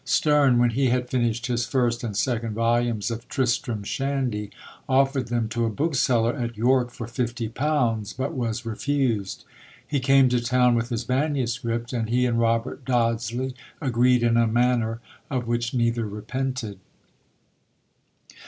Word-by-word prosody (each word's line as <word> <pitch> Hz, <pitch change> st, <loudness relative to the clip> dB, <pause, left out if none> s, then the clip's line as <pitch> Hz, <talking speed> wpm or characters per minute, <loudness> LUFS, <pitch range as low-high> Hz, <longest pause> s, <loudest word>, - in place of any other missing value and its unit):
Sterne, 140 Hz, -1 st, +3 dB
when 120 Hz, 0 st, +3 dB
he 130 Hz, +3 st, +1 dB
had 125 Hz, 0 st, 0 dB
finished 120 Hz, -2 st, 0 dB
his 120 Hz, -1 st, -1 dB
first 120 Hz, -3 st, 0 dB
and 105 Hz, -4 st, -3 dB
second 115 Hz, -3 st, -1 dB
volumes 115 Hz, -1 st, +1 dB
of 115 Hz, +1 st, -6 dB
Tristram 120 Hz, -4 st, -1 dB
Shandy, 130 Hz, -4 st, -2 dB, 0.4 s
offered 135 Hz, 0 st, +2 dB
them 120 Hz, -1 st, -1 dB
to 120 Hz, +1 st, -1 dB
a -, -, +1 dB
bookseller 125 Hz, -2 st, +1 dB
at 120 Hz, -4 st, -4 dB
York 125 Hz, +2 st, +2 dB
for 120 Hz, -1 st, -7 dB
fifty 120 Hz, 0 st, -3 dB
pounds; 120 Hz, -4 st, 0 dB
but 130 Hz, +2 st, -3 dB
was 120 Hz, -1 st, -3 dB
refused: 115 Hz, -3 st, -1 dB, 0.4 s
he 145 Hz, -, -1 dB
came 135 Hz, 0 st, +5 dB
to 125 Hz, -1 st, +1 dB
town 125 Hz, 0 st, +3 dB
with 120 Hz, 0 st, 0 dB
his 115 Hz, -3 st, -3 dB
MSS.; 130 Hz, -2 st, 0 dB, 0.3 s
and 115 Hz, -2 st, -2 dB
he 125 Hz, +2 st, +2 dB
and 115 Hz, -1 st, +1 dB
Robert 115 Hz, +3 st, 0 dB
Dodsley 120 Hz, +1 st, 0 dB, 0.3 s
agreed 125 Hz, -3 st, +2 dB
in 115 Hz, 0 st, +3 dB
a 115 Hz, -1 st, +4 dB
manner 115 Hz, 0 st, +1 dB, 0.3 s
of 125 Hz, -3 st, -2 dB
which 120 Hz, 0 st, -1 dB
neither 115 Hz, -2 st, 0 dB
repented. 110 Hz, 0 st, -4 dB
120 Hz, 150 wpm, -24 LUFS, 115-130 Hz, 0.4 s, came